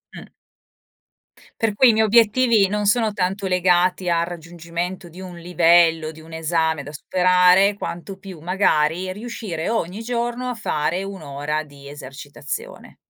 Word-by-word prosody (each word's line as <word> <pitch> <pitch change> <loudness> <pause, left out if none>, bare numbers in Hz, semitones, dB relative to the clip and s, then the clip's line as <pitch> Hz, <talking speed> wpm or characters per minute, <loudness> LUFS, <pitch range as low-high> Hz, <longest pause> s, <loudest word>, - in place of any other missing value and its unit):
Mh. - - -11 1.3
Per 225 -2 +1
cui 255 +4 +6
i - - +7
miei 220 0 +2
obiettivi 225 -1 +4
non 210 +1 -1
sono 220 +1 +2
tanto 195 0 -2
legati 180 0 +2
al 170 0 +1
raggiungimento 170 +1 -6
di 170 +3 -13
un 185 -2 -9
livello, 165 -2 +3
di 160 0 -14
un 160 +1 -15
esame 160 -1 -1
da 145 - -10
superare, 180 +4 +3
quanto 190 -1 -7
più 190 -4 -11
magari 175 0 +1
riuscire 205 -5 -5
ogni 215 -2 -2
giorno 240 +1 -3
a 250 - -2
fare 175 -3 -2
1 195 -2 -7
ora 145 +1 -3
di 140 -1 -14
esercitazione. 145 - -8
180 Hz, 145 wpm, -21 LUFS, 160-205 Hz, 1.3 s, i